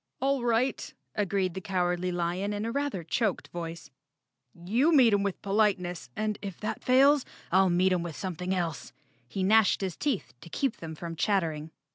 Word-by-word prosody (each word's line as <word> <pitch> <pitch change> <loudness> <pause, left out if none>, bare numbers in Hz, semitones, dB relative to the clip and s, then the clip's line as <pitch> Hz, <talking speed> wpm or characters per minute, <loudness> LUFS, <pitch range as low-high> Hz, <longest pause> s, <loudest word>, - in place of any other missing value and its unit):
"All 270 -1 +1
right," 240 +2 0 0.2
agreed 195 -3 0
the 190 - -5
Cowardly 180 -2 0
Lion 175 +4 -1
in 205 +1 -3
a 230 - -2
rather 280 -9 -2
choked 210 +5 -1
voice, 170 -2 -7 0.6
"you 225 - +1
meet 255 -8 +6
'em 200 - +3
with 200 -2 -2
politeness, 195 - 0
and 215 -1 -2
if 195 -4 -6
that 215 - -4
fails, 275 +2 +5 0.3
I'll 190 +1 +5
meet 185 +2 +3
'em 180 - +1
with 170 -3 -5
something 180 -1 -4
else." 170 -6 -2 0.3
He 190 +9 -3
gnashed 210 +1 +4
his 185 -4 -2
teeth 280 -9 -2
to - - -11
keep 270 - -1
them 160 -1 -7
from 165 +1 -6
chattering. 160 -5 0
190 Hz, 175 wpm, -28 LUFS, 175-220 Hz, 0.6 s, meet